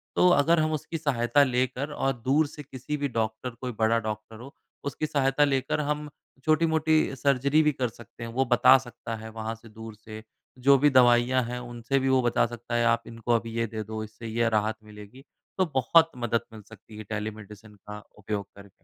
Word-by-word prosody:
तो 180 - +5
अगर 165 +1 +4
हम 155 0 +1
उसकी 155 +2 -4
सहायता 140 -2 +2
लेकर 130 +2 -1
और 135 -1 0
दूर 145 +4 +3
से 150 +1 -10
किसी-भी 145 +2 -4
डॉक्टर 110 +3 -2
कोई 125 - -3
बड़ा 115 +1 +3
डॉक्टर 110 0 -6
हो 135 +3 -11 0.3
उसकी 145 +2 -3
सहायता 140 0 +2
लेकर 135 +1 0
हम 150 0 -2 0.4
छोटी-मोटी 155 -2 +2
सर्जरी 140 +3 +2
भी 150 - +3
कर 130 -3 -2
सकते 120 +1 -13
हैं। 115 - -5
वो 135 +2 +1
बता 125 +2 +7
सकता 120 -3 -7
है 110 0 -9
वहाँ 110 0 -5
से 115 0 -16
दूर 110 0 -10
से 110 0 -11 0.4
जो 140 - +8
भी 145 +2 +4
दवाइयाँ 125 -1 +4
हैं 125 +1 -5
उनसे 120 +2 -2
भी 135 - 0
वो 130 -1 +4
बता 120 -1 +2
सकता 120 0 -6
है 120 0 +2
आप 115 0 +3
इनको 115 +1 -2
अभी 115 0 -3
ये 115 0 0
दे 110 0 -5
दो 110 +1 -5
इससे 110 +2 -10
यह 115 +1 0
राहत 110 +1 -1
मिलेगी 105 +5 -13 0.3
तो 190 - +3
बहुत 165 +5 +4
मदद 120 -1 0
मिल 110 - -10
सकती 110 0 -14
है 110 - -7
टेलीमेडि़सिन 105 0 -7
का 105 +1 -10
उपयोग 100 -1 -4
करके। 100 0 -17
120 Hz, 200 wpm, -26 LUFS, 110-140 Hz, 0.4 s, जो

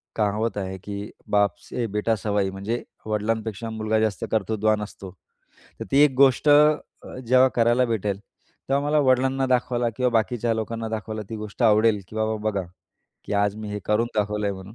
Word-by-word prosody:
कहावत 105 +1 0
आहे, 95 -1 -4
की 100 +2 -7 0.2
"बाप 100 -1 +2
से 120 - -2
बेटा 105 +2 0
सवाई" 100 -2 -1
म्हणजे 100 +5 -4 0.2
वडिलांपेक्षा 110 0 -2
मुलगा 110 0 -1
जास्त 110 -5 -1
कर्तृत्वान 110 0 +1
असतो. 100 -2 -9 0.7
तर - - -3
ती 135 - +4
एक 150 - +4
अ, - - -12
गोष्ट 135 +2 +4 0.8
जेव्हा 130 +2 +5
करायला 120 +2 +4
भेटेल, 105 -4 -1
तेव्हा 135 +6 -5
मला 150 +1 +2
वडिलांना 130 +1 +2
दाखवायला 125 -1 +1
किंवा 125 -1 +1
बाकीच्या 115 +1 +1
लोकांना 115 0 -3
दाखवायला 110 0 -4
ती 110 - -4
गोष्ट 105 +2 -6
आवडेल, 110 -1 +4
की 110 - -10
"बाबा 110 0 0
बघा, 100 -2 -2 0.6
की - - -6
आज 100 0 +1
मी 110 -1 -6
हे 105 - -3
करून 105 +2 +1
दाखवलंय 105 -1 0
म्हणून." 95 +2 -10
110 Hz, 170 wpm, -24 LUFS, 105-115 Hz, 0.8 s, जेव्हा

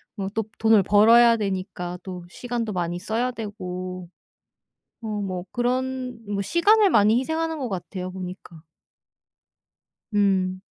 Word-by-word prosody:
뭐 195 -2 -3
또 225 - +1 0.2
돈을 220 -2 +5
벌어야 230 +4 +6
되니까 185 -3 -4
또 180 -2 -7
시간도 235 0 -4
많이 175 -1 -2
써야 235 +6 -1
되고 185 -5 -6 0.9
어 225 - -6
뭐 185 -2 -4
그런 255 0 -2
뭐 200 -1 -2
시간을 405 - +4
많이 215 - +4
희생하는 320 +3 -2
것 255 -5 -3
같아요 185 0 -5
보니까. 180 -3 -9 1.5
음. 190 -2 +1
205 Hz, 235 characters per minute, -24 LUFS, 185-240 Hz, 1.5 s, 벌어야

